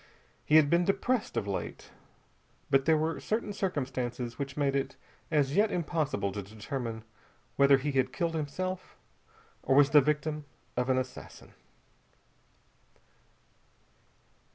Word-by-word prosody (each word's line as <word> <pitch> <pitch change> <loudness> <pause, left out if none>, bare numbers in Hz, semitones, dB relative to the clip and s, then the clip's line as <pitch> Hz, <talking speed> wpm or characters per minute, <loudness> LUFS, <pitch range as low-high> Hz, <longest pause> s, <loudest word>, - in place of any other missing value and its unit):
He 150 - +2
had 155 -2 +7
been 170 +4 +3
depressed, 215 +5 0
of - - 0
late, 100 -2 -5 0.8
but 135 0 +4
there 160 -1 +4
were 160 +1 -1
certain 215 -1 -2
circumstances 125 -9 -3
which 140 0 -4
made 140 -2 +1
it 135 0 -1 0.3
as 145 -2 +1
yet 210 +2 +4
impossible 150 - -1
to 100 +1 -4
determine 110 +3 -5 0.5
whether 140 0 +6
he 145 +2 -2
had 130 -1 +1
killed 170 -3 -1
himself 180 +5 -4 0.6
or 135 - +2
was 140 0 +6
the 150 - +8
victim 150 +1 -1 0.3
of 125 +1 0
an 130 - +3
assassin. 130 -1 -6
145 Hz, 130 wpm, -30 LUFS, 130-160 Hz, 0.8 s, the